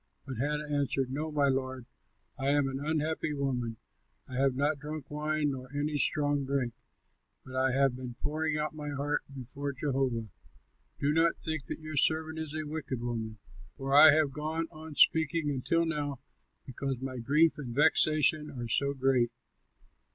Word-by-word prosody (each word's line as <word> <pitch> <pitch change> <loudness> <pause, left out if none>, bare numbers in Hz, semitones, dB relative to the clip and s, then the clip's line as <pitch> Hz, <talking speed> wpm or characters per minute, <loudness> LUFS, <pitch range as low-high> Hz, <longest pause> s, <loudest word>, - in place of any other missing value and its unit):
But 130 -3 -6
Hannah 150 +4 -1
answered, 140 -3 0
"No, 155 +3 -3
my 145 -2 +2
lord, 130 -2 -1 0.5
I 135 - -1
am 145 -1 +3
an 135 0 -3
unhappy 155 0 -1
woman; 125 -5 -2 0.5
I - - -11
have 135 0 +2
not 145 +2 +1
drunk 150 -1 -7
wine 150 0 0
nor 130 -1 -7
any 145 0 -1
strong 145 -1 +1
drink, 135 -3 -1 0.7
but 130 -1 -9
I 130 0 +2
have 135 -1 +3
been 125 -1 -7
pouring 155 +2 -1
out 150 +1 -2
my 150 -1 -6
heart 145 +1 -1
before 135 +2 -5
Jehovah. 130 -6 -1 0.7
Do 145 +1 +1
not 165 +1 +3
think 160 -4 -1
that - - -5
your 155 -1 -6
servant 160 +2 +2
is 155 -1 -5
a 155 0 -3
wicked 145 -4 -4
woman, 115 -2 -4 0.4
for 135 0 -3
I 150 +2 +10
have 155 -1 +3
gone 155 +3 -2
on 155 -1 -10
speaking 160 -1 +3
until 145 +5 +1
now 145 -4 -2 0.5
because 135 +1 -3
my 130 0 -5
grief 150 +7 +3
and 120 -5 -6
vexation 155 0 +4
are 120 -3 -6
so 140 +4 +2
great." 130 -3 +2
145 Hz, 165 wpm, -30 LUFS, 130-155 Hz, 0.7 s, I